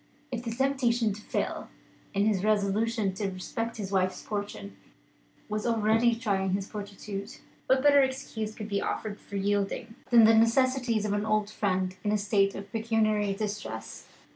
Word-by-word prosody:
If 240 -2 -3
the 235 - -3
temptation 240 -3 +1
to 210 - -9
fail - - -3 0.5
in 200 +1 +3
his 205 -3 +1
resolution 210 0 +1
to 195 +1 -2
respect 225 +5 -4
his 200 -3 -5
wife's 185 -1 +1
fortune 205 -1 -5 0.7
was 215 0 -2
already 225 +1 +3
trying 195 -5 0
his 195 0 -1
fortitude, 200 -1 -7 0.3
what 260 0 +3
better 285 -1 +7
excuse 225 -5 -2
could 215 - -6
be 200 -2 -1
offered 210 -1 -3
for 200 - -10
yielding 205 +3 -1 0.2
than 235 -2 +7
the 220 +1 +7
necessities 235 0 +3
of 205 - 0
an 205 0 0
old 215 -1 +1
friend 185 -3 -1
in 205 - +1
a 210 - +3
state 200 -1 +2
of 195 0 -8
pecuniary 215 -3 +1
distress? 200 - -5
210 Hz, 165 wpm, -28 LUFS, 200-230 Hz, 0.7 s, better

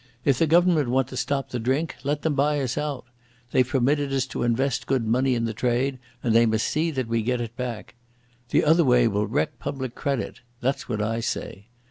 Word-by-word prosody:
If 135 -3 +3
the 165 - +3
Government 165 -4 +4
want 130 0 +1
to 130 - -8
stop 135 +2 -1
the 125 - -3
drink, 135 +8 -1
let 145 +1 -1
them 160 - +1
buy 145 +1 +2
us 130 -3 -2
out. 145 -4 -3 0.5
They've 130 -1 +3
permitted 140 +2 +1
us 135 -1 +1
to - - -3
invest 125 +3 0
good 130 -4 +1
money 125 +3 +2
in 115 -1 0
the 115 - -2
trade, 125 +4 0 0.2
and 115 - +2
they 115 +1 +5
must 110 0 +1
see 160 +3 0
that 130 -6 -2
we 115 0 0
get 125 +2 0
it 115 -1 -5
back. 125 -4 -5 0.6
The - - +3
other 165 +3 +5
way 125 -3 +4
will 105 -1 0
wreck 130 +8 -1
public 130 -3 -4
credit. 140 -2 -3 0.2
That's 135 +1 -2
what 105 -3 -1
I 115 +2 -1
say. 100 -2 -4
130 Hz, 215 wpm, -25 LUFS, 120-140 Hz, 0.6 s, they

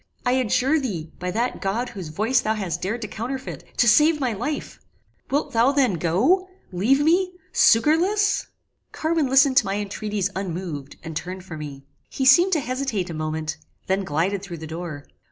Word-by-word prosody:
I 245 - +3
adjure 260 +4 +2
thee, 175 - -4
by 180 0 -3
that 235 +6 -2
God 225 +6 -1
whose 195 -8 -7
voice 215 +11 +1
thou 220 +1 0
hast 175 -5 -3
dared 220 +6 -2
to - - -3
counterfeit, 245 +5 -5
to 240 - +4
save 300 +8 +5
my 255 -4 0
life! 250 +8 -4 0.5
"Wilt 285 +2 -1
thou 235 +4 +4
then 270 -7 +2
go? 220 - +2 0.2
leave 215 +10 +2
me! 360 +4 +2 0.2
Succourless!" 385 - +3 0.4
Carwin 315 -2 0
listened 270 0 +4
to 245 - +6
my 195 - -1
intreaties 205 -1 -2
unmoved, 170 -7 -5
and 160 -1 -7
turned 180 +3 -5
from 160 -4 -8
me. 140 -2 -8 0.3
He 265 - -2
seemed 345 +8 +6
to 310 - +2
hesitate 250 -8 -2
a - - -5
moment: 155 0 -3 0.3
then 190 +1 0
glided 185 +4 -1
through 185 -4 -7
the 160 - -8
door. 160 -2 -6
215 Hz, 175 wpm, -23 LUFS, 180-270 Hz, 0.5 s, to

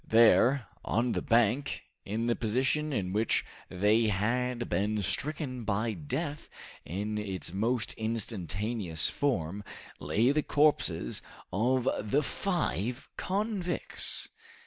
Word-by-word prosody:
There, 115 +3 +6 0.2
on 120 +2 +1
the - - 0
bank, 120 +4 +2 0.2
in 110 +3 -1
the 120 0 +2
position 130 +7 0
in 95 -8 -1
which 110 +2 +2 0.2
they 105 +5 +3
had 120 +4 0
been 105 +4 0
stricken 140 - -2
by 110 +2 0
death 140 - -4 0.3
in 105 +5 -3
its 95 -4 -5
most 115 +4 0
instantaneous 105 -4 -1
form, 105 - -1 0.4
lay 110 - +2
the 150 +1 +2
corpses 150 0 +2 0.3
of 125 +6 +2
the 120 +9 +1
five 135 - -1
convicts! 195 -2 -1
115 Hz, 110 wpm, -30 LUFS, 105-130 Hz, 0.4 s, There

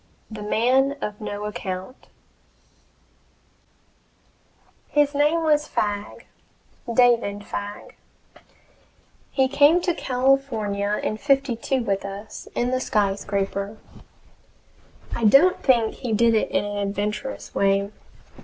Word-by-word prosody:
THE 215 -1 -7
MAN 255 +6 +2
OF 210 -3 -5
NO 205 0 -5
ACCOUNT 190 +1 -6 2.8
His 295 -1 +2
name 300 +3 +2
was 300 -1 +2
Fagg 205 0 -3 0.7
David 230 -4 +2
Fagg. 205 0 -7 1.3
He 265 -1 +2
came 285 +5 +5
to 350 0 0
California 250 -8 0
in 215 - -2
'52 270 -1 0
with 195 -3 -1
us, 200 +2 -8
in 245 +1 0
the 255 0 0
SKYSCRAPER. 200 0 -1 1.4
I 235 - -4
don't 275 - +5
think 235 -5 +3
he 240 -3 -4
did 230 +2 +4
it 220 - +1
in - - 0
an 205 0 -4
adventurous 205 +5 -3
way. 200 +1 +1
220 Hz, 105 wpm, -23 LUFS, 205-270 Hz, 2.8 s, came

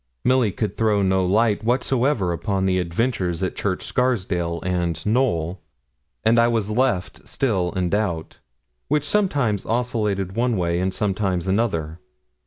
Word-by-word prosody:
Milly 125 -4 +3
could 105 +2 -3
throw 105 -3 +2
no 95 0 +2
light 105 +3 +2
whatsoever 120 -4 +1
upon 95 +2 -1
the 95 -1 +2
adventures 90 -1 -1
at 95 - -2
Church 95 -3 -2
Scarsdale 90 -9 0
and 85 -3 -1
Knowl; 100 -7 0 0.6
and 115 +2 +4
I 115 - +5
was 110 -3 0
left 110 -6 -1
still 95 -9 0
in 90 -2 -1
doubt, 100 -6 -2 0.5
which 150 0 +1
sometimes 145 - +1
oscillated 105 -5 -1
one 120 -1 +1
way 85 -1 0
and 95 +1 0
sometimes 95 -3 -1
another. 90 -6 -1
100 Hz, 140 wpm, -22 LUFS, 90-120 Hz, 0.6 s, I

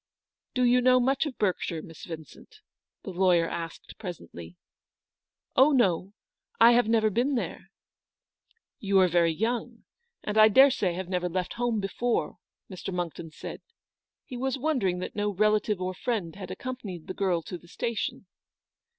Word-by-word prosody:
" - - -64
Do 255 - +2
you 250 +1 +4
know 255 0 +5
much 265 +4 +1
of 270 - -7
Berkshire, 180 -5 -1
Miss 165 - -11
Vin 160 -2 -7
cent? - - -18 0.2
" - - -62
the - - -6
lawyer 175 -2 +3
asked, 165 -1 -7
presently. 85 - -8 0.5
" - - -59
Oh, 275 +4 +6
no, 195 -6 +2 0.5
I 235 - +8
have 240 -1 +4
never 220 -1 +3
been 250 +7 +1
there." 235 - -4 0.6
" 455 - -45
You 195 -1 +1
are 185 -1 +6
very 170 -1 +3
young, 230 +5 -2 0.4
and 210 +1 0
I 215 - +9
daresay 235 -5 +5
have 185 +1 -5
never 180 -1 -1
left 180 +1 -2
home 235 -2 0
before? 225 +4 -1
" - - -64
Mr. 185 +1 -6
Monckton 175 -2 -4
said. 155 - -8 0.6
He 250 - -7
was 265 +2 -1
wondering 255 - 0
that - - -6
no 205 0 0
relative 210 0 +1
or 185 0 -2
friend 200 -6 -3
had 190 -2 -8
accom 255 +7 -6
panied 180 -6 -7
the - - -5
girl 180 -4 0
to 180 - -7
the 175 - -19
station. 220 +1 -3
200 Hz, 175 wpm, -27 LUFS, 180-240 Hz, 0.6 s, I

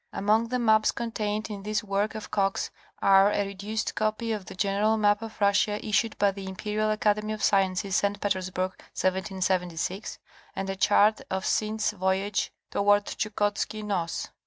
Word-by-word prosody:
Among 215 +3 +2
the 250 +2 -1
maps 220 -3 +4
contained 215 -2 -3
in 200 -1 -6
this 210 +1 -2
work 205 +1 -1
of 215 -4 -7
Coxe's 195 -1 0 0.3
are 195 +1 +6
a 205 -1 0
reduced 200 +2 -3
copy 215 +2 -1
of 210 -3 -3
the - - -9
general 200 +3 +1
map 205 0 +3
of 225 -1 -8
Russia 205 +1 +3
issued 220 +1 +1
by 200 -1 +3
the 195 0 -8
Imperial 210 +3 -2
Academy 215 0 +1
of 215 - -6
Sciences, 195 -1 +2
St. 200 0 0
Petersburg, 185 -2 -1 0.3
1776, 185 -1 -1 0.4
and 195 0 -2
a - - -4
chart 205 +2 +4
of 190 0 -2
Synd's 215 0 0
Voyage 190 +1 -1 0.2
toward 205 0 +3
Chukotski 210 0 -2
Noss. 180 -5 -2
205 Hz, 160 wpm, -27 LUFS, 195-215 Hz, 0.4 s, are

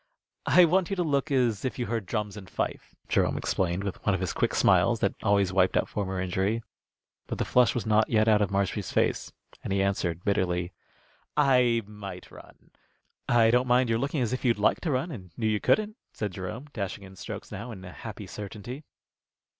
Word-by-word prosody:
"I 180 - +7
want 180 +2 +2
you 195 - -1
to 180 - 0
look 145 -1 0
as 125 -7 +1
if 130 - -2
you 120 - -1
heard 110 -3 -3
drums 105 +1 -2
and 95 -3 -10
fife," - - -4
Jerome - - +1
explained, 90 0 -1
with 100 -2 -5
one 100 - +2
of - - -2
his 95 -1 -2
quick - - 0
smiles, - - +4
that - - +1
always 100 -2 +2
wiped 95 -1 +3
out - - +1
former 95 -2 -3
injury. 95 +5 -1 0.6
But - - -4
the - - -1
flush 125 -4 +3
was 120 - -2
not 110 0 +3
yet 110 -1 +3
out 105 -1 +5
of 100 - +2
Marshby's 100 0 -1
face, - - 0 0.3
and - - -4
he 95 0 +2
answered, 90 -3 -1
bitterly, 90 -3 0 0.6
"I 125 -5 +4
might 100 -3 -9
run." - - -16 0.6
"I 115 -2 +5
don't 125 +1 +3
mind 125 -1 +3
your 115 - +2
looking 140 +1 0
as 120 - -1
if 130 - -3
you'd 120 -4 +3
like 105 - +2
to 165 - -1
run 135 +6 -1
and 95 - -8
knew 110 - -2
you 110 -1 +2
couldn't," 215 - +2 0.2
said 105 -3 -3
Jerome, 95 +8 -6
dashing 100 -1 -4
in 95 0 -12
strokes - - -8
now 115 +5 -6
in 95 -5 -9
a 90 - -8
happy 110 0 -8
certainty. 105 +8 -7
105 Hz, 210 wpm, -27 LUFS, 95-125 Hz, 0.6 s, I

